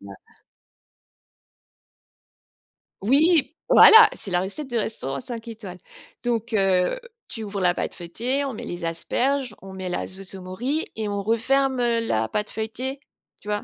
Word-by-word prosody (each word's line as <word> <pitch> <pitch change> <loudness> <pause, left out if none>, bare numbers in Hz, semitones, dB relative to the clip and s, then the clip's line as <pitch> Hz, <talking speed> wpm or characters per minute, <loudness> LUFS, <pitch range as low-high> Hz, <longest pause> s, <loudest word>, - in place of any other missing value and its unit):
bien 100 0 -11 2.9
Oui! 300 - +4
Voilà, 445 -1 +9
c'est 195 - -8
la 175 0 +2
recette 230 +10 -5
de 240 - -1
restaurant 210 -11 -3
5 240 -2 -8
étoiles. 210 -6 -8 0.5
Donc, 235 -1 -2
heu, 195 - +2 0.3
tu 225 -3 -6
ouvres 200 -1 -5
la 180 -1 +3
pâte - - -3
feuilletée, 240 +11 -2
on 270 - -4
met - - -7
les 175 0 -6
asperges, 255 +11 -1
on 190 0 -10
met 185 -1 -5
la 180 - -2
sauce 190 0 -5
aux 190 - -9
morilles 245 - -2
et 220 -1 -2
on 200 0 -2
referme, 260 +5 +1
heu, 235 -1 +2
la 110 - 0
pâte 210 - -2
feuilletée, 250 +5 -4 0.4
tu - - -16
vois, 210 0 -2
220 Hz, 160 wpm, -23 LUFS, 190-260 Hz, 2.9 s, Voilà